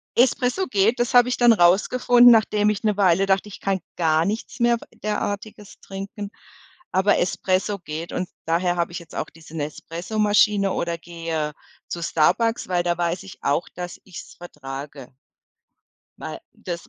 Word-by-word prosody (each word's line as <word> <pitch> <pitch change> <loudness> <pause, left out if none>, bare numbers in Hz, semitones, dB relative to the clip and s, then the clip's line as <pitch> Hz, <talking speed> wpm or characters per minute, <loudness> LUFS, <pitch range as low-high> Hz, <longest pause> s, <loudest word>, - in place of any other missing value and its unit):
Espresso 250 +8 +2
geht, 220 +2 +2
das 240 +1 0
habe 245 0 +6
ich 250 - -1
dann 240 -1 +6
rausgefunden, 240 +6 +5
nachdem 215 -2 +3
ich 210 0 -2
'ne 210 -2 +2
Weile 190 -1 +3
dachte, 195 +1 +1
ich - - -10
kann 195 -1 -1 0.2
gar 160 -2 +2
nichts 220 +4 -4
mehr 235 0 +3
w - - -13 0.2
Derartiges 210 0 -4
trinken. 200 +1 -7 0.6
Aber 190 +2 +3
Espresso 190 +3 0
geht 165 0 -6
und 180 - -3 0.2
daher 175 +2 +1
habe 170 0 -1
ich 170 - -5
jetzt 170 -2 -14
auch - - -3
diese 160 0 -12
Nespresso-Maschine 200 +6 +1
oder 170 0 -2
gehe 165 -3 -4 0.3
zu 170 - -5
Starbucks, 225 +9 +1
weil 180 -1 0
da 175 0 0
weiß 175 +1 -1
ich 195 - -12
auch, 145 +5 0
dass 180 -1 -6
ich's 185 -4 -11
vertrage. 135 -5 -9 1.1
Weil - - -7
das 170 -1 -7
190 Hz, 160 wpm, -23 LUFS, 170-210 Hz, 1.1 s, habe